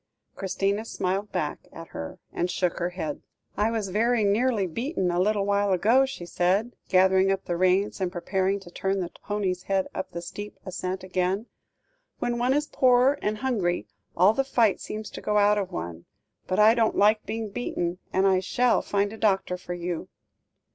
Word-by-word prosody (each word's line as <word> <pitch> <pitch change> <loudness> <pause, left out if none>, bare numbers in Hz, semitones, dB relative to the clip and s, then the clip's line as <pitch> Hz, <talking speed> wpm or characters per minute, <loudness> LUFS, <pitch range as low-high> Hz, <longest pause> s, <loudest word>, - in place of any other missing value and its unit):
Christina 195 +2 -1
smiled 195 -1 -2
back 150 - -2
at 165 0 -10
her 80 - -7 0.2
and 175 - -1
shook 180 -1 -1
her 175 - 0
head. 160 -5 -5 0.3
"I 210 +2 +2
was 220 -4 -2
very 225 +3 +2
nearly 210 +1 +2
beaten 190 - -1
a 175 - 0
little 205 +1 +2
while 200 0 +2
ago," 235 +9 +4
she 265 -10 -7
said, 190 +7 0
gathering 190 +1 +4
up 195 0 -2
the 175 - -1
reins 185 +3 +2
and 180 -1 0
preparing 190 +2 0
to 175 -2 -13
turn 195 +2 -1
the 175 -2 -3
pony's 195 -3 -1
head 195 0 0
up 190 - -4
the 170 - -6
steep 205 +4 -7
ascent 185 0 -4
again; 185 +3 -1 0.7
"when 240 0 -1
one 250 +2 +2
is 295 +1 +1
poor, 255 +1 +3
and 210 +1 -1
hungry, 210 -9 0 0.3
all 185 +5 +6
the 270 - +1
fight 235 -6 +2
seems 215 0 -6
to - - -8
go 210 - 0
out 205 0 +4
of 195 - -3
one. 85 0 -6 0.4
But 185 - -1
I 215 +1 +7
don't 230 -2 +2
like 215 +2 +4
being 220 -1 -3
beaten, 175 -6 -3
and 190 +1 +2
I 190 -1 +4
shall 240 +6 +2
find 205 +1 0
a - - -8
doctor 195 -4 +1
for 180 -1 -6
you." 175 -1 -4
195 Hz, 190 wpm, -26 LUFS, 180-215 Hz, 0.7 s, I